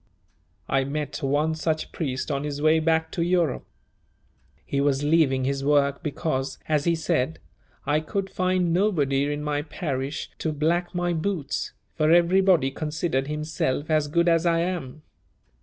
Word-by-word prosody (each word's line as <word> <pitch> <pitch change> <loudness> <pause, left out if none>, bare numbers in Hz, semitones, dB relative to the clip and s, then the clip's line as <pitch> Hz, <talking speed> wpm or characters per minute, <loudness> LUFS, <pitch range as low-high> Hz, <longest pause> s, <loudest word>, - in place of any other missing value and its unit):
I 135 0 +2
met 145 +2 -4
one 145 +3 +1
such 160 0 -2
priest 135 -2 -3
on 140 0 -1
his 145 -1 -4
way 155 +2 +4
back 160 0 +1
to 175 - -2
Europe. 170 -5 +1 1.0
He 140 - -1
was 140 0 +1
leaving 145 -4 +3
his 135 +1 -1
work 140 -1 +2
because, 145 -2 -2
as 150 -2 +1
he 170 -1 +3
said, 155 -2 0 0.5
"I 145 +2 +2
could 195 +5 -3
find 185 -2 0
nobody 145 -8 +1
in 145 0 -3
my 145 -1 -1
parish 145 -3 -4
to 160 - -1
black 170 +4 0
my 175 0 0
boots, 165 -3 -2 0.2
for 155 0 +1
everybody 175 -3 +4
considered 150 -2 -2
himself 150 -1 -2
as 155 -1 +2
good 170 +4 +1
as 165 -1 +4
I 165 0 +3
am. 155 -5 -4
155 Hz, 155 wpm, -25 LUFS, 140-170 Hz, 1.0 s, way